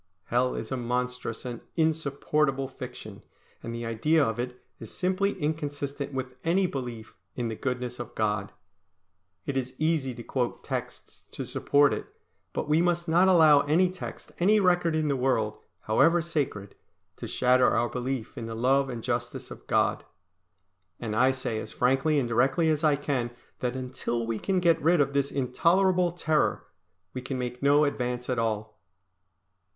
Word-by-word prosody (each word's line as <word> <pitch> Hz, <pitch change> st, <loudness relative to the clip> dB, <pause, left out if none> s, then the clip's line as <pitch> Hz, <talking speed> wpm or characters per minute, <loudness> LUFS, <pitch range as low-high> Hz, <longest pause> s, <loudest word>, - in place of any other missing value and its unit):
Hell 125 Hz, +4 st, +1 dB
is 110 Hz, -, -5 dB
a 130 Hz, -, -1 dB
monstrous 125 Hz, -1 st, -3 dB
and 120 Hz, -2 st, -5 dB
insupportable 150 Hz, -3 st, +1 dB
fiction, 125 Hz, -6 st, -9 dB, 0.4 s
and 115 Hz, -, -6 dB
the 115 Hz, 0 st, -4 dB
idea 145 Hz, +7 st, +2 dB
of 110 Hz, -1 st, -2 dB
it 125 Hz, 0 st, -4 dB, 0.2 s
is 115 Hz, -, -9 dB
simply 190 Hz, +2 st, 0 dB
inconsistent 145 Hz, -2 st, -3 dB
with 130 Hz, -1 st, -5 dB
any 180 Hz, +4 st, +2 dB
belief 120 Hz, -8 st, -5 dB, 0.2 s
in 120 Hz, -2 st, -2 dB
the 110 Hz, -, -4 dB
goodness 125 Hz, 0 st, -3 dB
of 120 Hz, -, -7 dB
God. 105 Hz, -2 st, -1 dB, 0.9 s
It 140 Hz, -, -3 dB
is 130 Hz, -1 st, -2 dB
easy 155 Hz, -5 st, 0 dB
to 120 Hz, -, -8 dB
quote 125 Hz, -1 st, -2 dB
texts -, -, -6 dB
to -, -, -5 dB
support 145 Hz, 0 st, +3 dB
it, -, -, -4 dB, 0.4 s
but -, -, -3 dB
we 155 Hz, +2 st, +3 dB
must 175 Hz, -1 st, +1 dB
not 175 Hz, +4 st, +4 dB
allow 160 Hz, -6 st, +7 dB
any 170 Hz, +6 st, +3 dB
text, 185 Hz, -, -8 dB
any 205 Hz, +5 st, +4 dB
record 175 Hz, -4 st, +3 dB
in 155 Hz, -1 st, +1 dB
the 140 Hz, -, +1 dB
world, 125 Hz, -5 st, 0 dB, 0.2 s
however 165 Hz, +11 st, +4 dB
sacred, 145 Hz, -, -3 dB, 0.4 s
to -, -, -6 dB
shatter 125 Hz, 0 st, +4 dB
our 120 Hz, -, +1 dB
belief 125 Hz, 0 st, -4 dB
in 115 Hz, -4 st, -5 dB
the 115 Hz, -, -5 dB
Love 135 Hz, +4 st, +2 dB
and 120 Hz, -3 st, -5 dB
Justice 120 Hz, -1 st, -3 dB
of -, -, -11 dB
God. -, -, +1 dB, 1.0 s
And 110 Hz, -3 st, -3 dB
I 130 Hz, +4 st, +5 dB
say 130 Hz, -4 st, -2 dB
as 110 Hz, -, -7 dB
frankly 135 Hz, +5 st, +2 dB
and 130 Hz, -4 st, +1 dB
directly 135 Hz, +8 st, +2 dB
as 155 Hz, 0 st, +1 dB
I 150 Hz, -2 st, +4 dB
can 140 Hz, -4 st, -1 dB, 0.3 s
that 125 Hz, 0 st, -2 dB
until 125 Hz, -2 st, -3 dB
we 115 Hz, -1 st, -2 dB
can 190 Hz, -2 st, 0 dB
get 170 Hz, -2 st, +3 dB
rid 170 Hz, +2 st, +4 dB
of 140 Hz, -1 st, +2 dB
this 140 Hz, 0 st, +1 dB
intolerable 175 Hz, +8 st, +2 dB
terror, 160 Hz, -3 st, 0 dB, 0.5 s
we 130 Hz, -, -4 dB
can 130 Hz, +1 st, -4 dB
make 125 Hz, 0 st, -4 dB
no 145 Hz, +2 st, +5 dB
advance 125 Hz, -3 st, -2 dB
at 125 Hz, -, 0 dB
all. 110 Hz, -3 st, -2 dB
130 Hz, 170 wpm, -27 LUFS, 120-155 Hz, 1.0 s, allow